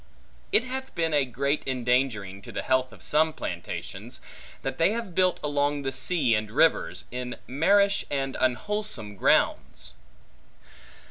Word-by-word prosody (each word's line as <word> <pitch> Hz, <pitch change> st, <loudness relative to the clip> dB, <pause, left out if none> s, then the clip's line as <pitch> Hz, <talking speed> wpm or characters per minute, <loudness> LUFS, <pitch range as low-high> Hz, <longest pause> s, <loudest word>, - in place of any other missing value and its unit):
It 225 Hz, -, +4 dB
hath 265 Hz, +1 st, -6 dB
been 165 Hz, -2 st, 0 dB
a 145 Hz, -2 st, +3 dB
great 140 Hz, +4 st, -1 dB
endangering 125 Hz, -6 st, 0 dB
to -, -, -10 dB
the -, -, -4 dB
health 130 Hz, -1 st, +1 dB
of 115 Hz, -, -13 dB
some 155 Hz, +1 st, +3 dB
plantations, 85 Hz, -, -6 dB, 0.4 s
that 135 Hz, 0 st, -4 dB
they 165 Hz, +6 st, +4 dB
have 230 Hz, -6 st, -4 dB
built 185 Hz, +1 st, +2 dB
along 145 Hz, 0 st, 0 dB
the 135 Hz, -, -1 dB
sea 130 Hz, -1 st, +2 dB
and 110 Hz, -1 st, 0 dB
rivers, 150 Hz, +8 st, +2 dB
in 125 Hz, 0 st, -4 dB
marish 200 Hz, +9 st, +3 dB
and 135 Hz, -2 st, -2 dB
unwholesome 130 Hz, -, -2 dB
grounds. 60 Hz, -9 st, +1 dB
135 Hz, 140 wpm, -27 LUFS, 125-165 Hz, 0.4 s, It